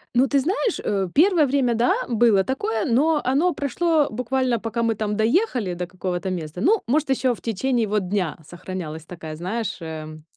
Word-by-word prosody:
Ну 255 +3 +4
ты 280 +1 +2
знаешь, 370 - 0
э, 195 -2 0
первое 335 0 +5
время, 260 -3 +1
да, 235 +2 +3
было 230 -4 +3
такое, 225 -3 -2
но 295 +6 +2
оно 295 +8 +2
прошло 300 +2 +1
буквально, 250 +1 0
пока 230 +1 -3
мы 230 -1 +1
там 210 0 -2
доехали 225 - +1
до 180 +1 -3
какого-то 185 +1 -4
места. 170 -1 -5
Ну, 405 - +3
может, 295 +4 +1
ещё 260 -2 +1
в - - -18
течение 235 +1 0
вот 205 -2 -1
дня 185 -6 -1
сохранялась 170 -2 -7
такая, 160 -2 -8
знаешь, 195 +7 -3
эм, 155 -1 -7
230 Hz, 180 wpm, -23 LUFS, 185-270 Hz, -, первое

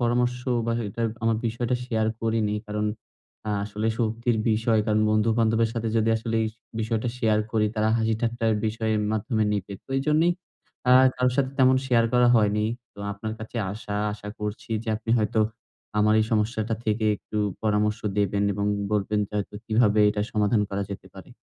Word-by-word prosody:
পরামর্শ 120 +1 +1 0.3
বা 115 - +1 0.2
এটা 100 - -7 0.2
আমার 115 0 +2
বিষয়টা 120 +2 -1
শেয়ার 110 -3 0
করিনি। 110 -2 0
কারণ 105 0 -1 0.6
অ্যা 105 - -2
আসলে 105 +2 -2
শক্তির 115 +1 0
বিষয় 110 +1 +2
কারণ 110 -1 +2
বন্ধু-বান্ধবের 115 +1 +2
সাথে 115 -1 -2
যদি 110 0 +2
আসলে 115 0 -3
এই 110 - 0 0.3
বিষয়টা 110 +1 -1
শেয়ার 110 -3 +2
করি 110 -2 +2
তারা 110 0 +1
হাসি 110 0 +1
ঠাট্টার 115 -1 0
বিষয়ের 110 0 0
মাধ্যমে 110 0 0
নিবে। 100 -1 -3
তো - - -66
এইজন্যই 155 +5 +3 0.5
অ্যা 125 0 +6 0.2
কারো 125 0 +2
সাথে 130 -2 +1
তেমন 130 0 +5
শেয়ার 120 -3 +3
করা 125 0 +5
হয়নি। 105 -1 +2 0.3
তো - - -18
আপনার 110 +2 -5
কাছে 110 +2 -8 0.2
আশা 105 0 -7 0.2
আশা 105 0 -8
করছি 105 +2 -5
যে, - - -7
আপনি 115 +1 -6
হয়তো 110 0 0 0.6
আমার 105 +1 +4
এই - - +2
সমস্যাটা 110 +1 0
থেকে 110 0 0
একটু 105 - -9 0.3
পরামর্শ 105 0 +1 0.2
দেবেন 100 0 +1
এবং 100 +1 -2 0.3
বলবেন 105 0 +1
যে, - - -33
হয়তো 105 0 -5
কিভাবে 110 -1 +3
এটা 105 0 -1
সমাধান 105 0 +2
করা 100 0 -1
যেতে 100 - -7
পারে? - - -12
110 Hz, 175 wpm, -25 LUFS, 105-115 Hz, 0.6 s, অ্যা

